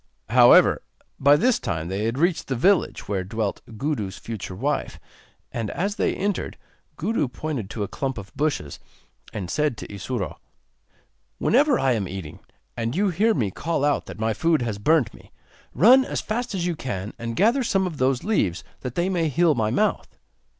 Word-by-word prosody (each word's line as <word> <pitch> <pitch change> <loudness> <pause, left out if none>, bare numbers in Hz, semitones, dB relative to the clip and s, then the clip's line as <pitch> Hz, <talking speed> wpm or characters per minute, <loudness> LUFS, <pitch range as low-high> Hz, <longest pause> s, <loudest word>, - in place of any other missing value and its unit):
However, - - +6 0.4
by 140 +1 +6
this 245 +11 +2
time 85 -7 -3
they 95 +4 -2
had 115 +3 -1
reached 170 +3 +1
the 135 - -1
village 185 +10 +2
where 95 -3 -1
dwelt 105 +1 -3 0.2
Gudu's 110 -8 -2
future 105 -5 -6
wife, 140 +9 -2 0.5
and 115 -3 -3
as 200 +4 -2
they - - +1
entered 200 0 -2 0.4
Gudu 175 -4 0
pointed 125 -5 -4
to 105 - -3
a - - -3
clump 135 +2 -3
of 100 +5 -9
bushes, 140 - -2 0.5
and 100 -4 -5
said 150 +3 0
to - - -8
Isuro: 95 -5 -4 1.0
'Whenever 280 +2 +3
I 135 - +2
am 105 -6 0
eating, 95 -5 -7 0.4
and 115 +3 -2
you 200 +2 +2
hear 215 +6 +2
me 105 -7 0
call 155 - -1
out 145 - 0
that - - -8
my 110 +1 0
food 160 +4 +1
has 110 -4 -3
burnt 150 +2 +2
me, - - -17 0.4
run 245 - +6
as - - -3
fast 230 -1 -3
as 175 -2 -1
you 175 -2 -1
can 105 -8 -5
and 115 0 -4
gather 235 - +3
some 195 -4 +1
of 170 -5 -4
those 130 0 +1
leaves 100 - 0 0.2
that 125 -2 -6
they 175 +1 +1
may 170 -4 0
heal 165 +3 +3
my 110 -5 0
mouth. 210 - -1
135 Hz, 185 wpm, -24 LUFS, 105-175 Hz, 1.0 s, However